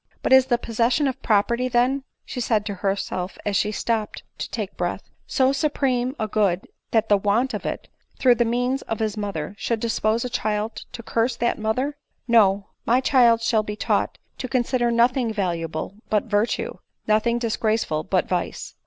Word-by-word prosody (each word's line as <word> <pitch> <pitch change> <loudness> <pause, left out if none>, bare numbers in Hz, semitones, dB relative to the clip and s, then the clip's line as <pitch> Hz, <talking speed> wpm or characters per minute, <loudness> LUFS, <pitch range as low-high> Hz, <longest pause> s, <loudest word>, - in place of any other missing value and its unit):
"But - - +3
is 265 -1 +7
the 240 -2 +3
possession 240 +5 +1
of 265 0 -3
property, 235 +3 +2
then," 255 +3 +1 0.2
she 250 - -5
said 220 -3 +1
to 205 - -3
herself 195 -1 -2
as 205 -1 0
she 210 +2 +2
stopped 220 0 -2 0.2
to - - -4
take - - -4
breath, - - -3
" - - -41
so 265 -1 +4
supreme 270 -3 0
a 215 - -1
good, 200 -4 +1 0.2
that 225 -2 +2
the 205 - +5
want 220 +6 +1
of 210 - -3
it, - - -4 0.3
through 255 -2 +5
the 240 0 +2
means 245 +3 0
of 225 - -4
his 215 -1 -1
mother, 200 -5 -4
should 230 -2 -1
dispose 225 0 0
a - - 0
child 215 -1 -2
to 235 -2 -7
curse 230 +2 0
that 235 -1 0
mother? 255 +7 -1 0.3
No; 205 -4 +4
my 245 +2 +3
chDd 240 -4 +4
shall 230 -2 +3
be 210 0 -5
taught - - 0 0.2
to 255 - -3
consider 245 -1 +1
nothing 235 0 +2
valuable 170 -4 -2 0.2
but 210 -1 +2
vir 210 0 +1
tue, - - -4 0.3
nothing 220 +2 +2
disgraceful 220 -8 0
but 185 +1 0
vice. 180 - -3
230 Hz, 185 wpm, -23 LUFS, 210-245 Hz, 0.3 s, is